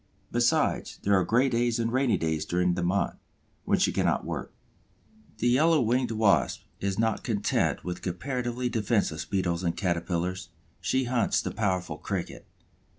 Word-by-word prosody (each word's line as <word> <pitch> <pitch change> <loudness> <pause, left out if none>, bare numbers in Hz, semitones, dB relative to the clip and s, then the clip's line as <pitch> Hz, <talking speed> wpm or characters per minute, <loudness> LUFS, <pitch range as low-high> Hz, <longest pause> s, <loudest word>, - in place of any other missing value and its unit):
Besides, 120 0 +1
there 100 - +2
are 95 -1 +4
gray 125 +7 +3
days 120 -1 +1
and 115 0 -1
rainy 130 -6 +2
days 80 -2 -1
during 90 +2 +1
the - - -2
month, 90 +3 0 0.5
when - - +3
she - - +2
cannot - - 0
work. - - -4 0.9
The 115 - 0
Yellow 155 +6 +4
winged 125 +1 +1
Wasp 110 -3 +2 0.2
is 100 -1 -2
not 115 0 0
content 105 -4 0
with 90 -1 -5
comparatively 125 +6 -2
defenseless 105 -8 0
Beetles 90 -3 -1
and 85 -2 -1
Caterpillars; 90 0 -2 0.3
she 130 0 +1
hunts 125 -1 +1
the - - -3
powerful 90 -7 -1
Cricket. 95 0 -5
105 Hz, 150 wpm, -28 LUFS, 90-120 Hz, 0.9 s, are